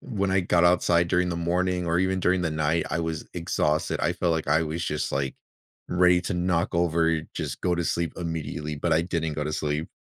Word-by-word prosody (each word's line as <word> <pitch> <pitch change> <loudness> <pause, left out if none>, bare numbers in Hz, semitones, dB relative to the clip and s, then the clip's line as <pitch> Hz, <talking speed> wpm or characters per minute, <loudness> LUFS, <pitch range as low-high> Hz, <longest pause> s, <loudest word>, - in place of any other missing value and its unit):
when 100 -5 -2
I 95 0 +3
got 85 -1 +2
outside 85 -1 +3
during 90 +1 +2
the 85 - -2
morning 90 +1 0
or 85 +1 +1
even 95 0 +1
during 90 0 +2
the 80 - 0
night, 80 +1 0
I 80 - -1
was 80 -2 -3
exhausted. 75 -2 -1
I 85 - +1
felt 90 -1 0
like 80 -2 -2
I 80 +2 +3
was 80 +2 -3
just, 75 -1 -2
like, 70 -1 -1 0.5
ready 90 0 +4
to 90 - -3
knock 90 -1 0
over, 80 -1 +2
just 75 -5 -4
go 90 -1 +2
to 85 -1 -2
sleep 85 0 -1
immediately, 80 -3 -4
but 70 - 0
I 80 - +3
didn't 85 -3 -2
go 75 - -2
to 75 - -3
sleep. 75 +1 -2
85 Hz, 220 wpm, -26 LUFS, 80-90 Hz, 0.5 s, ready